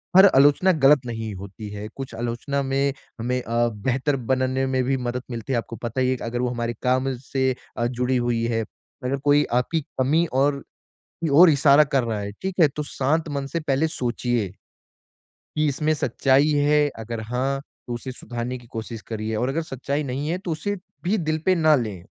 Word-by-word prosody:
पर 190 +1 +10
आलोचना 145 +7 +5
ग़लत 145 -2 +5
नहीं 115 -2 -4
होती 100 +2 -8
है। 105 +1 -6
कुछ 135 -4 -7
आलोचना 120 +4 -2
में 135 +1 +1 0.3
हमें 125 +2 -1
अ, 120 +1 +1
बेहतर 130 +6 -1
बनने 130 0 +1
में 130 -1 +1
भी 135 +2 +1
मदद 125 0 -3
मिलती 115 +2 -4
है, - - +2
आपको 115 0 -4
पता 120 +2 -3
ही 130 - +2
है 130 - +2
कि - - -9
अगर 120 +1 -3
वो 125 - +1
हमारे 120 -1 -2
काम 130 +1 +2
से 130 +1 0 0.3
अ, 120 - 0
जुड़ी 125 +1 0
हुई 120 -1 0
है। 115 -1 0 0.4
अगर 130 +2 0
कोई 145 0 +5
आपकी 125 +7 +1 0.2
कमी 155 +6 +3
और 140 +1 +2 0.6
की 160 - +1
ओर 170 +4 +9
इशारा 140 0 +6
कर 140 -3 +1
रहा 115 -3 -2
है, 100 0 -4
ठीक 190 -1 -3
है? 155 - +8
तो 150 +1 -5
शांत 150 +3 -1
मन 140 - -2
से 170 - -2
पहले 150 0 +1
सोचिए 120 -5 -1 0.9
कि, 155 - -3
इसमें 150 +2 +1
सच्चाई 135 0 +2 0.2
है? 150 0 +4
अगर 115 0 -5
हाँ, 125 +5 -1 0.3
तो 120 - -3
उसे 125 +2 -5
सुधारने 120 +1 -5
की 120 -1 -15
कोशिश 115 0 -6
करिए 110 0 -3
और 125 +4 0
अगर 160 +4 -1
सच्चाई 140 0 -3
नहीं 140 +2 -3
है, 175 - 0
तो 185 -2 -5
उसे 185 +6 -2 0.3
भी 195 +5 +1
दिल 155 -3 0
पे 185 - +4
ना 155 -2 +5
लें। 105 -9 -3
130 Hz, 205 wpm, -24 LUFS, 120-145 Hz, 0.9 s, पर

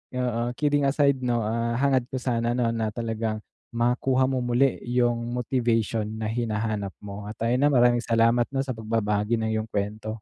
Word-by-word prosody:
oo, 120 -1 -1
kidding 145 +1 +1
aside 140 0 +3
'no, 120 -1 +1
ah, 115 +2 -1
hangad 135 -3 +2
ko 130 - -2
sana 120 -1 0
'no 120 -2 +1
na 110 -2 -2
talagang 115 -2 -3 0.3
makuha 125 +2 +1
mo 130 -1 0
muli 125 +2 +1
yung 120 -1 +1
motivation 115 -3 0 0.2
na 110 - -3
hinahanap 110 -3 -2
mo 100 0 -7
at 110 - -8
ayun, 125 +5 +3
ah, - - +2
maraming 120 -1 +4
salamat 115 +1 +3
'no 135 - +1
sa 135 - -4
pagbabahagi 110 0 0
ng 110 - -1
iyong 110 - -4
kuwento. 105 +1 -3
120 Hz, 175 wpm, -25 LUFS, 110-125 Hz, 0.3 s, maraming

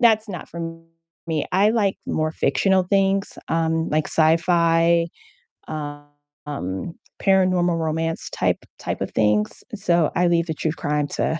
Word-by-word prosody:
that's 220 -2 +4
not 180 -4 -7
for 170 - -7 0.7
me, 160 -2 0
I 200 +3 +4
like 205 -4 +1
more 155 0 -1
fictional 190 +2 +2
things, 195 +1 +1
um, 165 0 0
like 155 0 +1
sci-fi, 165 +1 +3 0.6
um, 145 -1 -6 1.1
paranormal 185 -3 +3
romance 160 0 -2
type - - +1 0.2
type - - -3
of - - -3
things, 105 -1 +1
so 175 -6 +2
I 175 0 +3
leave 170 0 +2
the 160 - -1
true 155 0 -2
crime 150 -2 -1
to 160 - 0
165 Hz, 135 wpm, -22 LUFS, 160-185 Hz, 1.1 s, that's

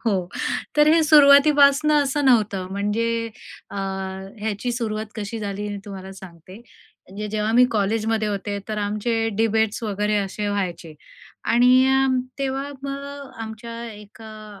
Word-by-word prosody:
हो, 190 -5 +1 0.5
तर 295 0 +5
हे 330 - +4
सुरुवातीपासून 285 0 +6
असं 290 0 +1
नव्हतं. 210 -7 +2
म्हणजे 230 +3 -1 0.4
अ, - - -8 0.7
याची 220 +3 -2
सुरुवात 220 -2 -3
कशी 220 +2 -5
झाली 205 -1 -4
हे 205 - -4
तुम्हाला 190 -1 -8
सांगते. 185 0 -13
म्हणजे 210 -2 -11
जेव्हा 215 +1 -1
मी 245 +2 +6
कॉलेजमध्ये 220 +1 0
होते, 200 0 -3
तर 215 -1 -3
आमचे 225 +2 -1
डिबेट्स 220 0 +1
वगैरे 210 0 -1
असे 205 +1 -2
व्हायचे 180 -5 -3 0.5
आणि 250 +3 +5 0.5
तेव्हा 275 0 -2
मग 280 0 -7
आमच्या 230 +1 -8
एका 210 0 -12
220 Hz, 125 wpm, -22 LUFS, 205-250 Hz, 0.7 s, सुरुवातीपासून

